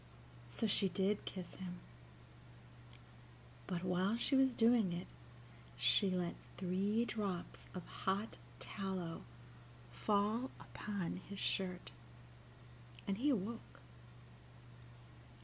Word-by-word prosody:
So 170 - -1
she 195 -2 +4
did 195 +3 +1
kiss 185 -3 -6
him; 180 -1 -5 1.9
but 175 -1 -1
while 185 +4 +2
she 270 - +2
was 265 -2 +5
doing 225 -4 +5
it 175 +1 -3 0.7
she 200 - +5
let 180 -2 0 0.2
three 195 +5 +2
drops 200 -7 -3
of 180 - -4
hot 195 +3 -1 0.2
tallow 175 - -3 0.7
fall 210 - +2
upon 200 -5 -3
his 200 - -5
shirt, 185 -2 0 1.2
and 200 +1 0
he 285 +4 +3
awoke. 230 -2 -1
195 Hz, 95 wpm, -39 LUFS, 180-215 Hz, 1.9 s, was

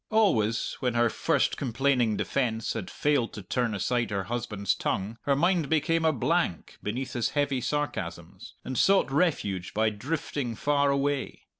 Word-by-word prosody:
Always 120 - +2
when 125 -3 -1
her 120 -1 +3
first - - +1
complaining 125 -3 +1
defence 115 -5 -1
had 110 -5 -5
failed 145 -6 0
to 105 - -7
turn 115 +3 -1
aside 120 +3 0
her 100 -1 -1
husband's 105 -2 -1
tongue, 105 +5 -3
her 140 - +3
mind 170 0 +2
became 160 +1 +2
a 160 - +5
blank 135 - -1
beneath 125 +5 -3
his 120 -2 0
heavy 140 -3 +1
sarcasms, 145 +3 -4
and 130 - -2
sought 195 -7 +4
refuge 105 - 0
by 110 0 +2
drifting 130 +1 -3
far 145 +3 +2
away. 140 0 -1
125 Hz, 155 wpm, -28 LUFS, 110-145 Hz, -, a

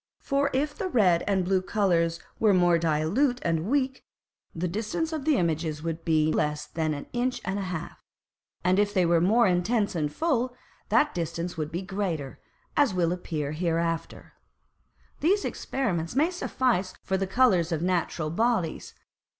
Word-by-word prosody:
For, 280 0 0
if 290 +3 0
the 390 - -3
red 190 - +3
and 190 -3 +1
blue 190 0 +2
Colours 170 -5 +1 0.2
were 210 -3 +4
more 175 -2 +4
dilute 165 - +1
and 165 +1 0
weak, 265 0 0 0.5
the 175 +2 -1
distance 225 - -2
of 305 -3 -4
the 310 -2 +3
Images 160 -3 -1
would 165 0 -3
be 155 -1 +2
less 150 0 0
than 155 -2 -2
an 145 - -7
Inch 250 +1 0
and 190 +2 -1
a - - -2
half; 180 -4 -6 0.6
and 180 +2 +3
if 205 0 +1
they 185 -2 +4
were 170 -1 +3
more 220 +7 +4
intense 200 +4 +1
and 150 -4 -1
full, 255 - 0 0.3
that 295 - +3
distance 170 0 -3
would 155 -1 -4
be 175 +3 -3
greater, 180 -8 -3 0.4
as 275 -10 +3
will 170 -2 +2
appear 155 -5 -3
hereafter. 165 0 -2 0.9
These 395 +6 +2
Experiments 180 -10 -2
may 310 +6 +3
suffice 245 - 0
for 190 - -1
the 190 0 -1
Colours 190 -6 +3
of 160 0 -1
Natural 170 -3 -1
Bodies. 220 -4 -1
180 Hz, 165 wpm, -27 LUFS, 165-240 Hz, 0.9 s, were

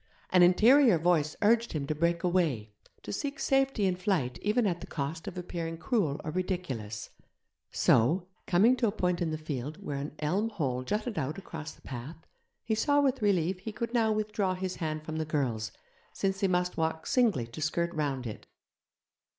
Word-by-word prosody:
An 185 - +6
interior 225 +5 +6
voice 160 -2 +2
urged 230 +2 +3
him 150 -3 -2
to 155 - -1
break 170 +2 0
away, 155 - 0 0.3
to - - -5
seek 285 +8 -3
safety 270 -6 +2
in 185 -1 +2
flight 180 - -1
even 215 +3 +2
at 175 -3 0
the - - -7
cost 160 +2 -4
of 180 - -6
appearing 170 -2 -4
cruel 170 - 0
or 155 - -3
ridiculous; 140 - -3 0.6
so, 165 +11 +3 0.2
coming 215 +8 +5
to 235 - +2
a - - +1
point 180 -4 0
in 170 - +1
the 155 - -2
field 150 -1 -5
where 170 -8 -5
an 145 +1 -6
elm 190 +9 0
hole 135 - -2
jutted 210 - -2
out 145 +3 -3
across 160 -5 -7
the - - -23
path, 130 +5 -7 0.5
he 225 - -1
saw 285 +7 +3
with 270 -3 +2
relief 185 -3 +2
he 220 +4 -6
could 235 +2 -4
now 225 -2 +3
withdraw 210 -3 0
his 185 0 -4
hand 155 -2 -3
from 155 0 -5
the 160 - 0
girl's, 130 -8 -1 0.4
since 195 0 -1
they 195 - +2
must 180 -1 0
walk 160 0 -1
singly 225 - +2
to 115 +6 -9
skirt 170 +3 0
round 140 -5 -2
it. 110 -2 -7
175 Hz, 190 wpm, -30 LUFS, 150-205 Hz, 0.6 s, An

